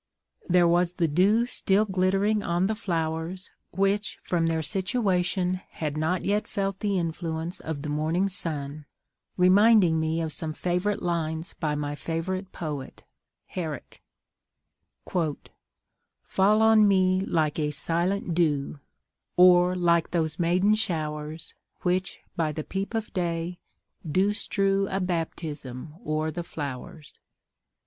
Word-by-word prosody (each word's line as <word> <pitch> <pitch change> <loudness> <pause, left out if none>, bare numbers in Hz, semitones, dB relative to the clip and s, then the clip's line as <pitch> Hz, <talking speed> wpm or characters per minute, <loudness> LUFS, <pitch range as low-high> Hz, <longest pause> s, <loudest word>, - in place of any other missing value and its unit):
There 175 -1 +5
was 175 +1 +2
the 170 -2 +1
dew 195 +9 +3
still 210 -3 +1
glittering 195 +2 +1
on 175 -1 +1
the 215 - +1
flowers, 170 -3 -3 0.2
which, 195 +2 0
from 170 -2 +1
their 160 -1 0
situation, 185 - 0
had 150 -2 -4
not 160 +4 0
yet 205 +2 +1
felt 195 -2 -2
the 200 -2 0
influence 165 0 -3
of 155 -3 -5
the 150 - -4
morning 160 +6 +1
sun, 150 -6 -5 0.5
reminding 185 -2 +5
me 160 +1 0
of 160 -1 -2
some 155 +1 -4
favourite 180 +5 -1
lines 165 -1 -2
by 150 -2 -2
my 145 0 -2
favourite 185 +5 -3
poet, 150 -5 -6 0.4
Herrick: 155 -7 -6 1.0
"Fall 160 -5 -1 1.3
on 220 -1 +6
me 185 -1 +3
like 160 -5 0
a 150 -1 +1
silent 170 +5 -1
dew, 150 -4 0 0.6
Or 180 0 +6
like 170 -2 +2
those 160 -1 -1
maiden 180 +5 +3
showers, 155 -6 -2 0.3
Which, 185 +1 -1
by 160 -2 0
the 155 +1 -4
peep 195 +6 -4
of 225 -1 -3
day, 175 -1 -2 0.4
do 185 +6 +1
strew 195 -1 +1
A 190 - -1
baptism 160 -6 -4
o'er 155 +1 -1
the 175 +3 -4
flowers." 145 -1 -7
175 Hz, 125 wpm, -26 LUFS, 160-190 Hz, 1.3 s, on